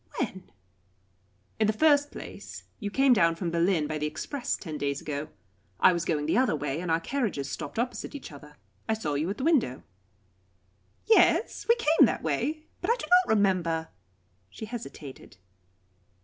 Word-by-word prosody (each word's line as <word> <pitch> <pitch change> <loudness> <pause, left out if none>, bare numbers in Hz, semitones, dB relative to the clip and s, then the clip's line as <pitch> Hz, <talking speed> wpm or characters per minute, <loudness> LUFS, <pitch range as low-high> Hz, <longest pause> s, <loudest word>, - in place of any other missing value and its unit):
"When?" 190 -7 -4 1.1
"In 215 - +3
the 215 - +2
first 290 +4 +4
place, - - -9 0.2
you 205 -3 -3
came 270 +4 +4
down 165 -6 +3
from 170 0 -3
Berlin 170 -1 +2
by 155 +1 -3
the 150 - -1
express, 245 - -3
ten 155 -5 -7
days 140 -1 -1
ago. 150 0 -4 0.5
I 185 - +6
was 170 -1 -2
going 150 -3 0
the 160 - +2
other 255 -10 +2
way, 145 0 -3
and 180 - -4
our 165 0 +2
carriages 195 - -2
stopped - - -6
opposite 245 +5 -3
each 280 - -8
other. 150 +1 -13 0.3
I 220 - +3
saw 155 -9 -3
you 150 +5 -1
at 200 - -3
the 260 - -4
window." 275 - +1 1.2
"Yes 445 0 +3
we 465 - +7
came 320 - +5
that - - -3
way, 275 - -1 0.2
but 360 - -2
I 470 - +4
do - - -6
not 360 -9 +4
remember 175 -5 +1 0.3
" 90 +1 -41
She 220 - -8
hesitated. 165 - -9
185 Hz, 175 wpm, -28 LUFS, -, 1.2 s, we